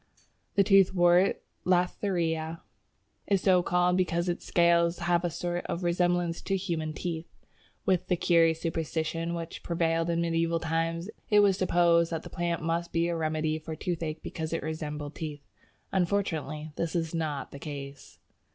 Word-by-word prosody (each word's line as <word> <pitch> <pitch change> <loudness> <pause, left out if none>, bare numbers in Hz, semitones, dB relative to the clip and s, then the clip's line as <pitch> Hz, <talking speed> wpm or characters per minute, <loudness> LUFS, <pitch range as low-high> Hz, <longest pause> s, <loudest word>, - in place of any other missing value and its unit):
The 200 - +5
Toothwort 185 -2 +5 0.3
(Lathraea) 170 -3 0 0.7
is 195 -2 +2
so 185 -2 +4
called 180 +1 +2
because 175 -1 0
its 175 - -2
scales 170 0 +3
have 175 0 +1
a 175 - +1
sort 175 +2 -3
of 175 - -3
resemblance 175 -1 +1
to 195 - -1
human 165 -5 -2
teeth. 165 0 -4 0.6
With 185 -1 +1
the 180 - +2
curious 165 -2 +3
superstition 165 0 -2
which 165 -1 -6
prevailed 165 0 0
in 170 0 +1
medieval 165 0 +1
times, 165 +3 -1 0.2
it 210 -1 +6
was 200 -2 +4
supposed 170 -2 +3
that 165 -1 -3
the - - -10
plant 170 -1 -2
must 170 +1 -1
be 170 +1 +1
a 170 - -1
remedy 155 -1 -1
for 160 0 -6
toothache 165 -2 -3
because 160 0 -4
it 165 - -2
resembled 150 -2 -4
teeth. 150 -3 -6 0.5
Unfortunately 165 -5 -1
this 170 +1 -2
is 165 -1 -1
not 155 -4 -3
the 140 - -9
case. 140 -2 -8
170 Hz, 155 wpm, -29 LUFS, 160-175 Hz, 0.7 s, it